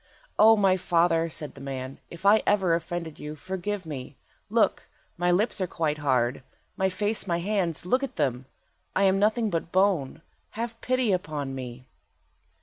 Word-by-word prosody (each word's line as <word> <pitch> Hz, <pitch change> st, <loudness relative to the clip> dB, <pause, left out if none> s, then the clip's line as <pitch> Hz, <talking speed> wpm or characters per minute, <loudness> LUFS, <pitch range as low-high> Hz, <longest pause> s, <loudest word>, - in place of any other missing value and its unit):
"O 220 Hz, +1 st, +8 dB
my 195 Hz, -2 st, +4 dB
father," 165 Hz, -2 st, +2 dB
said 150 Hz, -2 st, -5 dB
the 135 Hz, -, -12 dB
man, 135 Hz, -1 st, -6 dB
"if 170 Hz, +3 st, -11 dB
I 210 Hz, +2 st, +6 dB
ever 190 Hz, -4 st, +3 dB
offended 165 Hz, -1 st, -3 dB
you, 150 Hz, +1 st, -6 dB
forgive 190 Hz, +4 st, -4 dB
me! 140 Hz, -5 st, -7 dB, 0.3 s
Look! -, -, +2 dB, 0.3 s
my 175 Hz, 0 st, 0 dB
lips 195 Hz, +4 st, +2 dB
are 185 Hz, -, +1 dB
quite 155 Hz, -3 st, -1 dB
hard; 130 Hz, -3 st, +1 dB, 0.3 s
my 190 Hz, 0 st, +1 dB
face, 205 Hz, +2 st, -2 dB
my 170 Hz, -2 st, +1 dB
hands, 175 Hz, -3 st, -1 dB
look 255 Hz, +9 st, +2 dB
at 275 Hz, -, -4 dB
them! 130 Hz, -4 st, -1 dB, 0.5 s
I 195 Hz, -, +3 dB
am 195 Hz, 0 st, +4 dB
nothing 215 Hz, +1 st, +2 dB
but 165 Hz, 0 st, -2 dB
bone. 180 Hz, -6 st, +1 dB, 0.3 s
Have 230 Hz, 0 st, -4 dB
pity 255 Hz, -3 st, +1 dB
upon 150 Hz, -7 st, -2 dB
me." 125 Hz, -1 st, -7 dB
175 Hz, 165 wpm, -27 LUFS, 150-200 Hz, 0.5 s, O